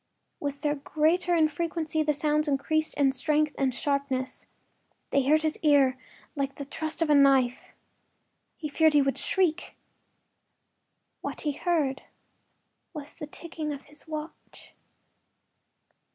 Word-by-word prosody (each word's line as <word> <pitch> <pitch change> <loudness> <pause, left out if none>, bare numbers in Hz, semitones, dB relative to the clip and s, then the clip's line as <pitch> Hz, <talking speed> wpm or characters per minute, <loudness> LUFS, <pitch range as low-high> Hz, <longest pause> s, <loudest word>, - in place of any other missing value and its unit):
With 285 -1 -4
their 295 -1 +1
greater 315 +5 +1
infrequency 315 0 0
the 305 0 +2
sounds 300 +1 +1
increased 315 +3 0
in 280 -2 +3
strength 300 +3 +1
and 270 -1 +1
sharpness. 280 -1 -2 0.6
They 280 - +3
hurt 305 +4 +3
his 310 -1 -1
ear 280 -4 +4 0.4
like 275 -1 -2
the 280 - -6
thrust 315 +3 -3
of 305 - 0
a - - +7
knife; 270 -3 +3 0.8
he 305 - -4
feared 315 +1 +3
he 290 - +6
would 270 0 -1
shriek. 360 -3 +1 1.5
What - - -3
he 300 - 0
heard 285 -4 0 0.9
was 295 -1 -7
the 300 - -8
ticking 315 0 -5
of 285 -1 -6
his 300 +2 -11
watch. 310 0 -9
300 Hz, 130 wpm, -27 LUFS, 280-315 Hz, 1.5 s, a